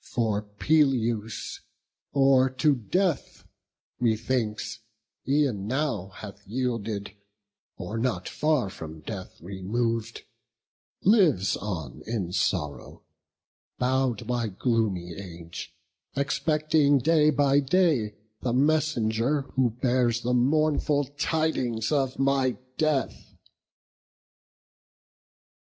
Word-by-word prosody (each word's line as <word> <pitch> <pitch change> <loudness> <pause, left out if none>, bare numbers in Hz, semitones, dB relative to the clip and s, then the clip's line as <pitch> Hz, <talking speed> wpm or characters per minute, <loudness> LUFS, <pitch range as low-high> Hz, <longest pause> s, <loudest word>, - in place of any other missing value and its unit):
For 110 -4 0
Peleus 115 -1 0 0.5
or 135 -1 +4
to 130 +4 +2
death, 170 - -1 0.5
methinks, 115 -1 -1 0.5
e'en 135 -8 +1
now 130 -7 -1
Hath 100 +1 -10
yielded, 110 -4 -2 0.7
or 105 +5 -4
not 110 -7 -1
far 150 -10 0
from 80 -4 -9
death 95 +2 -7
remov'd, 115 +5 -2 0.8
Lives 175 - +4
on 80 -11 -5
in 105 -6 -2
sorrow, 75 -7 -2 0.7
bow'd 130 -3 0
by 120 -2 -1
gloomy 100 -5 -1
age, 85 -3 -8 0.4
Expecting 150 +1 +2
day 155 +3 +4
by 140 -1 +3
day 140 - +2 0.3
the 120 - -1
messenger 140 -2 +2
Who 130 -2 +3
bears 120 0 +1
the 125 +1 0
mournful 145 +3 +2 0.2
tidings 130 -9 0
of 135 -3 +1
my 135 -2 +2 0.2
death." 155 -4 -1
120 Hz, 90 wpm, -27 LUFS, 105-140 Hz, 0.8 s, or